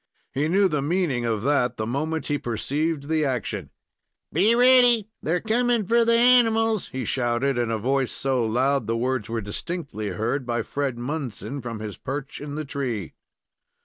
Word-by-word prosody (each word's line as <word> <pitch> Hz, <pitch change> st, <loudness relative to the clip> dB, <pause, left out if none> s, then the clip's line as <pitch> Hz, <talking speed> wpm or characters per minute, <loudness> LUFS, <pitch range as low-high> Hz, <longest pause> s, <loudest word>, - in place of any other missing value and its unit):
He 145 Hz, +3 st, 0 dB
knew 195 Hz, +4 st, +4 dB
the 150 Hz, -5 st, -1 dB
meaning 145 Hz, -5 st, 0 dB
of 110 Hz, -2 st, -1 dB
that 125 Hz, -3 st, +1 dB
the 110 Hz, -, -2 dB
moment 155 Hz, +7 st, -2 dB
he 145 Hz, -1 st, -1 dB
perceived 140 Hz, +5 st, -2 dB
the 160 Hz, 0 st, +1 dB
action. 130 Hz, -6 st, -2 dB, 0.6 s
"Be 200 Hz, +9 st, +4 dB
ready! 245 Hz, -3 st, +5 dB
they're 175 Hz, +3 st, 0 dB
coming 235 Hz, 0 st, +1 dB
for 235 Hz, +4 st, +4 dB
the 230 Hz, 0 st, +3 dB
animals!" 225 Hz, -3 st, +4 dB
he 130 Hz, -2 st, -4 dB
shouted, 125 Hz, +2 st, 0 dB
in 120 Hz, -1 st, 0 dB
a 115 Hz, -, 0 dB
voice 130 Hz, +3 st, 0 dB
so 130 Hz, -3 st, 0 dB
loud 130 Hz, +5 st, +1 dB
that 110 Hz, -, -12 dB
the 115 Hz, 0 st, 0 dB
words 125 Hz, -2 st, -1 dB
were 115 Hz, 0 st, -2 dB
distinctly 110 Hz, -, -5 dB
heard 110 Hz, +8 st, -2 dB
by 120 Hz, -1 st, -1 dB
Fred 140 Hz, -4 st, -2 dB
Munson 135 Hz, 0 st, -4 dB
from 115 Hz, -3 st, -6 dB
his 105 Hz, -4 st, -6 dB
perch 140 Hz, +1 st, -5 dB
in 145 Hz, 0 st, -6 dB
the 155 Hz, 0 st, -4 dB
tree. 125 Hz, -, -4 dB
140 Hz, 180 wpm, -24 LUFS, 120-175 Hz, 0.6 s, ready